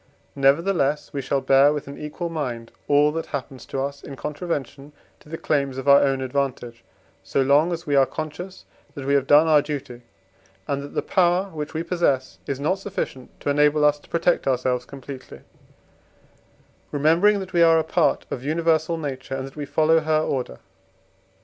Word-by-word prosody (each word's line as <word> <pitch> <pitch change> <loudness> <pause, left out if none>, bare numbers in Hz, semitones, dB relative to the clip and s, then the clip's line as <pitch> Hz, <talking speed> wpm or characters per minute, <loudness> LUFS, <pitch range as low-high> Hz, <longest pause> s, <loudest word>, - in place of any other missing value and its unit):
Nevertheless, 145 +1 +1
we 140 - -2
shall 135 +1 -1
bear 135 +2 +5
with 150 -2 -4
an 140 - -8
equal 150 +3 -5
mind 120 -7 -4 0.2
all 145 +1 +4
that 165 +1 -4
happens 135 -2 -6
to 135 - -4
us 140 +1 -4
in 135 - -9
contravention 145 -2 -5 0.3
to - - -19
the 165 - -5
claims 140 -5 -1
of 135 +1 -6
our 140 0 +7
own 135 -1 +1
advantage, 130 -3 -3 0.4
so - - -2
long 145 +6 +3
as 170 0 -4
we 145 - 0
are 135 -1 +5
conscious, 175 +5 -7 0.3
that 140 - -7
we 140 - +1
have 140 -1 +2
done 150 +2 +6
our 155 -2 +5
duty, 140 -4 -6 0.7
and 140 0 -1
that 140 - -10
the - - 0
power 185 +1 +2
which 150 0 -6
we 160 - -1
possess 145 -8 -1
is 135 -1 -3
not 160 +7 0
sufficient 185 -10 -5
to 145 - 0
enable 150 +1 +3
us 150 0 +3
to - - -22
protect 170 -1 +1
ourselves 125 -1 0
completely; 135 -1 -10 1.5
remembering 165 +8 +3
that 190 -1 -8
we 170 - +3
are 165 -1 +6
a 160 - +2
part 160 +1 +1
of 125 - -4
universal 160 +2 +1
nature, 135 -3 -5
and 135 0 -4
that 135 - -11
we 150 -1 -5
follow 160 +2 +3
her 155 0 +1
order. 130 - -3
145 Hz, 185 wpm, -23 LUFS, 135-160 Hz, 1.5 s, our